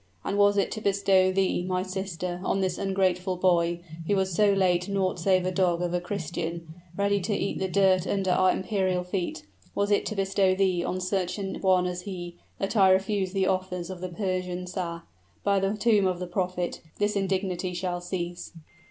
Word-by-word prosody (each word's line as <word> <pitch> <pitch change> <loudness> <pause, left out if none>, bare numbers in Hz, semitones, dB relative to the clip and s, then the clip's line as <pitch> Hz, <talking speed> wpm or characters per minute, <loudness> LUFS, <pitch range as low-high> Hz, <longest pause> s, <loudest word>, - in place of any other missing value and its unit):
And 200 - -2
was 205 0 +4
it 200 - +1
to 215 - -4
bestow 195 -2 +3
thee, 190 -1 +1
my 185 0 -1
sister, 185 -2 -4
on 195 - 0
this 185 -2 -1
ungrateful 190 -1 0
boy, 175 -2 +2 0.3
who 205 - +2
was 190 -1 0
so 205 +3 +4
late 185 -1 +2
naught 190 -2 0
save 185 +1 +2
a 185 - 0
dog 180 -2 +1
of 175 0 -2
a 180 - 0
Christian, 170 -3 -4 0.2
ready 200 0 +2
to 205 +3 -1
eat 200 - -2
the 190 - 0
dirt 190 -1 +3
under 195 -2 0
our 185 +1 +4
imperial 185 -2 0
feet, 180 - -3 0.3
was 205 +1 0
it 205 - +2
to 215 - -3
bestow 195 -1 +2
thee 185 -3 +1
on 185 - -2
such 185 0 -1
an 195 -1 -3
one 185 -2 +3
as 180 0 -3
he, 175 -3 -6 0.2
that 195 +3 -2
I 195 -3 +6
refused 190 0 +1
the 190 -1 +2
offers 185 -1 -2
of 180 -1 -8
the 185 - -4
Persian 180 -1 -3
Shah! 175 -2 -4 0.4
By 200 -1 +3
the 195 +2 0
tomb 210 -3 +3
of 185 -1 0
the 180 - -4
prophet! 180 0 -2 0.2
this 205 0 0
indignity 190 -2 -1
shall 175 0 -2
cease!" 175 -1 -5
185 Hz, 195 wpm, -27 LUFS, 180-195 Hz, 0.4 s, I